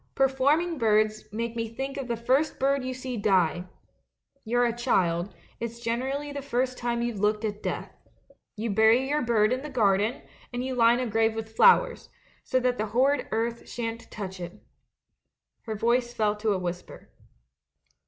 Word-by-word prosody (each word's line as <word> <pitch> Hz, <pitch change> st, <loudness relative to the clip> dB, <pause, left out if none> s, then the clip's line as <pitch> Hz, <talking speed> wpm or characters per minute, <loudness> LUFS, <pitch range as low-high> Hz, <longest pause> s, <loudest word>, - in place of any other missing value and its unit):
Performing 280 Hz, +5 st, +2 dB
birds 215 Hz, -1 st, +2 dB
make 230 Hz, +2 st, -3 dB
me 230 Hz, -1 st, -2 dB
think 270 Hz, +4 st, -4 dB
of 275 Hz, -3 st, -5 dB
the 235 Hz, -1 st, -2 dB
first 260 Hz, +7 st, +1 dB
bird 275 Hz, 0 st, +1 dB
you 255 Hz, -, -3 dB
see 255 Hz, -1 st, -5 dB
die 185 Hz, -4 st, +2 dB, 0.4 s
— 275 Hz, -, -46 dB
you're 245 Hz, +2 st, +2 dB
a 235 Hz, -1 st, 0 dB
child, 185 Hz, -7 st, +1 dB, 0.3 s
it's 235 Hz, 0 st, -5 dB
gener 235 Hz, +3 st, -2 dB
ally 290 Hz, 0 st, -5 dB
the 285 Hz, -, -4 dB
first 255 Hz, -1 st, -1 dB
time 235 Hz, -1 st, -2 dB
you've 235 Hz, -4 st, -3 dB
looked 210 Hz, +2 st, +1 dB
at 210 Hz, -1 st, -4 dB
death. -, -, -4 dB, 0.6 s
You 220 Hz, +1 st, -2 dB
bury 220 Hz, +5 st, +4 dB
your 295 Hz, +2 st, +1 dB
bird 230 Hz, -1 st, +2 dB
in 255 Hz, -, -2 dB
the 300 Hz, -, -7 dB
garden, 215 Hz, -3 st, +1 dB, 0.3 s
and 245 Hz, +1 st, -3 dB
you 260 Hz, -, -2 dB
line 235 Hz, -1 st, +4 dB
the 255 Hz, -, -1 dB
grave 225 Hz, 0 st, +1 dB
with 220 Hz, 0 st, -6 dB
flowers, 485 Hz, -, +4 dB, 0.3 s
so 255 Hz, -, +1 dB
that 250 Hz, -1 st, 0 dB
the 215 Hz, -, -1 dB
horrid 255 Hz, +5 st, +2 dB
earth 230 Hz, +1 st, -2 dB
shan't 230 Hz, -1 st, -5 dB
touch 190 Hz, -3 st, -6 dB
it.' 175 Hz, +4 st, -8 dB, 1.0 s
Her 220 Hz, -2 st, -3 dB
voice 240 Hz, +3 st, +1 dB
fell 210 Hz, -1 st, +1 dB
to 215 Hz, +1 st, -1 dB
a -, -, 0 dB
whisper. 180 Hz, -1 st, -6 dB
235 Hz, 180 wpm, -27 LUFS, 215-255 Hz, 1.0 s, bury